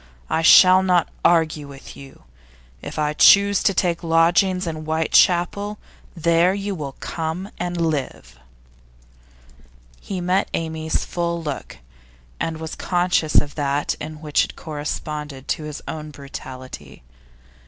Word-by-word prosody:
I 160 - +1
shall 185 +3 +7
not 180 -2 +2
argue 160 -3 +2
with 140 -1 -12
you. 135 -1 -14 0.6
If - - -8
I 150 -1 0
choose 200 +4 +6
to - - +3
take 175 -3 0
lodgings 170 +3 +2
in 165 -2 -4
Whitechapel, 175 +6 +1 0.4
there 170 +2 +2
you 200 0 -3
will 145 -6 -6
come 165 +7 -5
and 175 0 -3
live.' 135 - -3 1.6
He 190 - -5
met 180 +2 0
Amy's 160 -1 -2
full 170 -1 -3
look, 145 -3 -6 0.6
and 165 -1 -2
was 160 0 -6
conscious 175 -3 0
of 145 -1 +3
that 145 -1 -1
in 155 +1 -6
it - - -13
which 150 -2 0
corresponded 150 -2 -6
to 155 - -2
his 150 -1 -7
own 155 -1 -6
brutality. 130 - -10
160 Hz, 130 wpm, -21 LUFS, 150-175 Hz, 1.6 s, shall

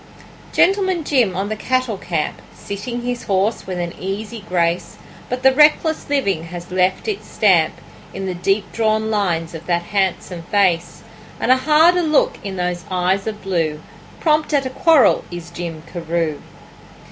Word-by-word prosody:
Gentleman 375 -3 +2
Jim 245 -11 +2
on 195 +2 -2
the 215 - -2
cattle 255 -2 -1
camp, 165 -4 -3
Sitting 235 +4 -5
his 245 0 -3
horse 195 +3 0
with 185 -1 -4
an 175 -1 -3
easy 205 +3 -5
grace; 170 -1 0 0.3
But 250 0 -3
the 265 - +7
reckless 305 +2 +3
living 200 - 0
has 175 +1 -9
left 185 - +1
its 425 -2 -3
stamp - - +3 0.4
In 195 - -5
the 185 - -2
deep 195 +3 -1
drawn 220 -1 0
lines 175 -6 -1
of 165 0 -9
that 175 -1 +1
handsome 185 -2 -1
face, 175 -2 0 0.4
And - - +2
a 260 - +6
harder 315 +6 +4
look 310 -3 +2
in 195 -2 -5
those 180 -1 -2
eyes 185 +2 0
of 215 -1 -5
blue: 165 -5 -1 0.4
Prompt 305 -1 +2
at 275 -1 +1
a 260 - -3
quarrel 320 +1 +4
is 175 -1 -8
Jim 170 -2 -6
Carew. 165 -3 -2
195 Hz, 160 wpm, -19 LUFS, 175-255 Hz, 0.4 s, the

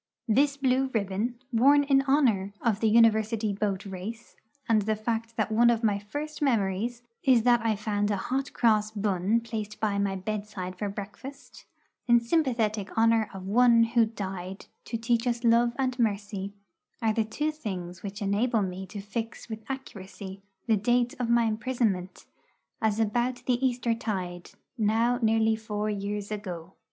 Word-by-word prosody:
This 275 +5 +3
blue 265 -1 +2
ribbon, 210 +4 -1 0.2
worn 280 +5 +5
in 275 -1 +4
honour 250 -9 +2
of 220 -4 0
the 220 - +2
University 220 -1 +3
boat 200 -1 -2
race, 200 +5 -7 0.3
and 225 -3 +4
the 215 +2 0
fact 225 +1 -3
that 220 -1 0
one 235 +2 +5
of 235 -1 +1
my 205 -2 +2
first 290 +10 -6
memories 230 -2 0 0.2
is 250 -4 +4
that 240 -1 +4
I 225 -1 +2
found 205 0 -1
a 205 - +1
hot 265 +7 -2
cross 215 -3 +2
bun 205 +1 0
placed 215 -2 -5
by 205 -2 0
my 200 -1 0
bedside 200 -1 -4
for 205 +2 -3
breakfast, 210 +8 -9 0.4
in 240 -1 +6
sympathetic 230 - 0
honour 225 -1 +3
of 190 -1 -8
One 230 +3 +5
who 230 0 +3
died 190 -3 -6 0.2
to 230 - -3
teach 230 +1 0
us 240 0 -1
love 235 0 +4
and 255 -2 -1
mercy, 200 -3 -1 0.5
are 220 -1 +1
the 225 - +1
two 295 +8 -2
things 185 - -6
which 200 0 -6
enable 215 +3 +1
me 190 0 -5
to 200 +2 -7
fix 225 +3 -5
with 220 0 -6
accuracy 195 -7 -7 0.2
the 225 -2 +3
date 240 +4 +1
of 240 -2 -1
my 235 0 +4
imprisonment 215 -4 -1 0.6
as 220 -1 +1
about 245 +3 0
the 250 0 +1
Easter 245 -2 +1
tide, 185 -6 -4 0.3
now 225 +3 +2
nearly 220 0 +3
four 215 -1 -3
years 205 0 -4
ago. 185 -4 -6
220 Hz, 165 wpm, -28 LUFS, 200-240 Hz, 0.6 s, in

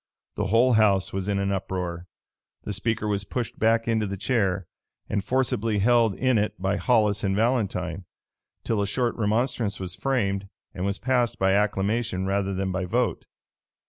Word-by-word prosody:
The - - -1
whole 120 +5 +4
house 100 -4 +3
was 95 0 -3
in 100 -1 0
an 100 0 0
uproar. 90 -2 -3 0.6
The 105 - -3
speaker 110 +1 -1
was 100 -1 0
pushed 120 +3 -4
back 115 +1 +2
into 110 -2 +1
the 100 0 -4
chair, 95 -5 0 0.4
and 100 -1 -1
forcibly 115 -2 0
held 115 0 +3
in 130 -3 +2
it 105 -3 -2
by 95 +2 0
Hollis 105 -4 +2
and 95 -1 +1
Valentine, 100 -6 0 0.6
till 110 -3 0
a 100 - 0
short 120 +3 0
remonstrance 115 0 0
was 90 -2 -5
framed, 100 -6 -1 0.3
and 90 - -3
was 100 0 -1
passed 125 -2 +1
by 95 0 +2
acclamation 105 0 0
rather 100 0 0
than 95 0 -1
by 95 0 -2
vote. 120 +6 -1
105 Hz, 170 wpm, -25 LUFS, 95-115 Hz, 0.6 s, whole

